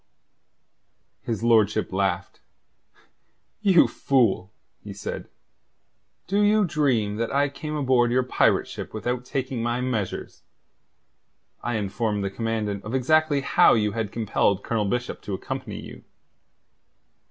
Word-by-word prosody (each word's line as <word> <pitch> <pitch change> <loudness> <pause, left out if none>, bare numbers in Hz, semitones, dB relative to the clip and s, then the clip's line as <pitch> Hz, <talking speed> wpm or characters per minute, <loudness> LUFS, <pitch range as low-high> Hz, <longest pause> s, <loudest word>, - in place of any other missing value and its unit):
His 115 -2 -3
lordship 110 -3 +3
laughed. 95 -1 -1 1.2
"You 190 -5 +5
fool," 110 -8 +1 0.3
he 100 -1 -8
said. 100 - -6 1.0
"Do 200 +2 +1
you 210 0 +4
dream 125 - +1
that 115 0 -2
I 140 +1 +2
came 150 +2 -6
aboard 130 -4 +2
your 130 +1 +3
pirate 125 - +2
ship - - -7
without 125 +3 -2
taking 130 -2 -3
my 120 +1 -1
measures? 120 -7 -3 1.2
I 120 - -2
informed 105 0 -1
the 100 - -2
Commandant 105 -2 -2
of 110 +5 -4
exactly 150 +2 +3
how 135 - +5
you 105 -2 +1
had 110 -1 -3
compelled 100 -3 0
Colonel 110 -3 -1
Bishop 125 +4 -2
to 100 - -4
accompany - - -6
you. - - -11
115 Hz, 125 wpm, -25 LUFS, 105-135 Hz, 1.2 s, You